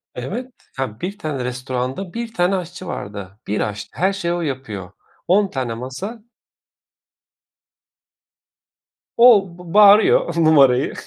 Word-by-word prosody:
Evet. 235 - -5 0.3
Ya, 115 -4 -4
1 195 +3 -4
tane 150 -10 -4
restoranda 130 +7 -4
1 230 -1 -5
tane 180 0 +1
aşçı 180 0 -6
vardı. 100 0 -7
1 105 - -1
aşçı. 105 0 -4
Her 190 +4 +1
şeyi 175 -3 -2
o 175 - -2
yapıyor. 110 - -5 0.4
10 200 +3 +3
tane 125 -4 -3
masa 135 - -6 3.0
O, 230 -5 +7
b 175 -1 -10
bağırıyor 205 -4 +6
numarayı 140 -5 +4
160 Hz, 120 wpm, -20 LUFS, 125-195 Hz, 3.0 s, O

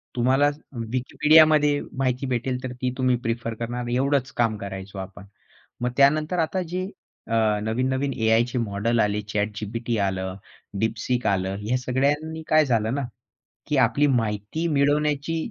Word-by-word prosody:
तुम्हाला 130 +4 +3 0.5
Wikipediaमध्ये 150 +2 +4 0.2
माहिती 130 0 0
भेटेल 125 +1 -2
तर 130 - -4
ती 130 - +1
तुम्ही 130 -1 +2
प्रिफर 115 0 -2
करणार 120 +2 -4
एवढंच 135 0 +1
काम 115 -2 +2
करायचो 95 0 -7
आपण. 95 +1 -9 0.6
मग 125 0 0
त्यानंतर 155 +5 +3
आता 180 +3 0
जे 185 +2 -2 0.4
अ, 110 -2 +2
नवीन-नवीन 130 +5 -1
एआयचे 115 +2 +2
मॉडेल 115 +1 0
आले 105 0 +1
ChatGPT 105 +3 -2
आलं, 95 -1 -2 0.5
DeepSeek 115 +2 -1
आलं 95 0 -1
ह्या 115 +5 0
सगळ्यांनी 145 +6 -1
काय 155 -1 +5
झालं 115 -1 +1
ना, 140 - -1 0.6
की 150 - 0
आपली 145 +5 +1
माहिती 115 +5 -1
मिळवण्याची 145 +2 +1
125 Hz, 135 wpm, -24 LUFS, 110-140 Hz, 0.6 s, काय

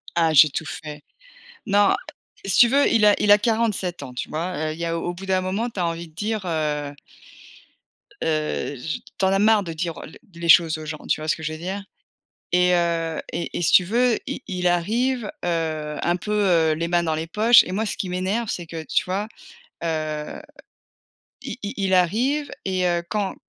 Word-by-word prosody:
Ah 165 -2 +3
j'ai 155 0 +7
tout 160 - -3
fait. 150 -3 -7 0.6
Non, 205 -1 +4 0.5
si 195 -1 0
tu 240 - +8
veux 280 +3 +3
il 225 -2 +4
a 205 - +6
il 210 - +2
a 205 - +7
47 210 -6 0
ans, 130 -3 -8
tu 125 - -4
vois? 170 +4 -3
Heu, - - -3
il 155 - -9
y 170 - -3
a 165 0 -1
au 175 +1 -3
bout 190 +2 -9
d'un 190 -1 +2
moment 195 +6 -2
tu 200 - -6
as 175 - +1
envie 170 0 -4
de 155 - -24
dire, 215 +4 -2
heu 150 -3 -2 1.3
heu, 155 -2 -1
j 155 +5 -4 0.2
tu - - +1
en - - +4
as 195 - +3
marre 215 +1 +4
de 170 -4 -6
dire, 165 0 -4
heu, - - -8
l 155 - -13 0.2
les 170 0 -5
choses 165 -1 +6
aux 155 - -8
gens, 155 0 -6
tu - - +1
vois 155 - -6
ce - - +2
que - - -10
je 155 - -2
veux 155 - -7
dire? 190 +4 -4 0.7
Et 180 0 +4
heu 165 -2 0
et 170 - -4
et - - -2
si 170 - +2
tu 185 - +7
veux, 235 +5 +2
i 270 0 -4
il 180 -1 -1
arrive, 225 +8 0
heu, 155 -3 -2
un 175 - +1
peu, 195 +4 -5
heu, 175 -6 +3
les 165 +2 -2
mains 175 0 +1
dans 160 -2 0
les 160 +1 -4
poches 220 +7 +6
et - - -6
moi 215 +3 -1
ce - - -3
qui 190 - -3
m'énerve 190 +6 -1
c'est 175 - -4
que, 165 0 -7
tu - - +1
vois? 195 +3 -2 0.6
Heu, 155 -2 -3 1.0
i - - -6
i 205 0 -4
il 195 -2 0
arrive 240 - +2 0.2
et 185 -1 0
heu, 175 -1 0
quand 205 -2 -2
175 Hz, 220 wpm, -23 LUFS, 160-205 Hz, 1.3 s, tu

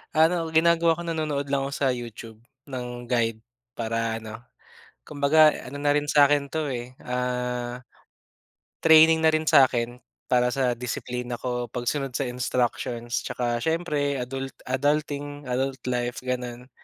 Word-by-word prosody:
Ano 160 +3 +5 0.2
ginagawa 165 0 +4
ko 170 - -7
nanonood 155 -4 -2
lang 135 -1 +1
ako - - -7
sa 140 - +1
YouTube 115 -2 -7 0.3
ng 125 -2 -6
guide 115 -2 -1 0.3
para 115 0 -2
ano, 110 0 -8 0.6
kumbaga 150 +1 +4 0.2
ano 135 - -8
na 145 0 +2
rin 145 0 +1
sa'kin 145 -1 +4
to 155 -1 -2
eh, 125 0 -6
ah, 125 0 -3 0.9
training 160 0 +6
na 160 - +5
rin 155 0 +1
sa 135 - +8
'kin 120 -1 -2 0.3
para 125 -1 +3
sa 125 -3 0
disiplina 125 0 -4
ko, 125 -1 -2
pagsunod 125 +3 -3
sa 130 0 -1
instructions, 120 -1 -2
'tsaka 120 -1 -1
siyempre 145 -2 -1
adult 135 +2 -5 0.2
adulting, 145 -1 -1
adult 130 +1 -1
life 120 0 -2
gano'n. 125 -1 -4
130 Hz, 140 wpm, -25 LUFS, 120-145 Hz, 0.9 s, sa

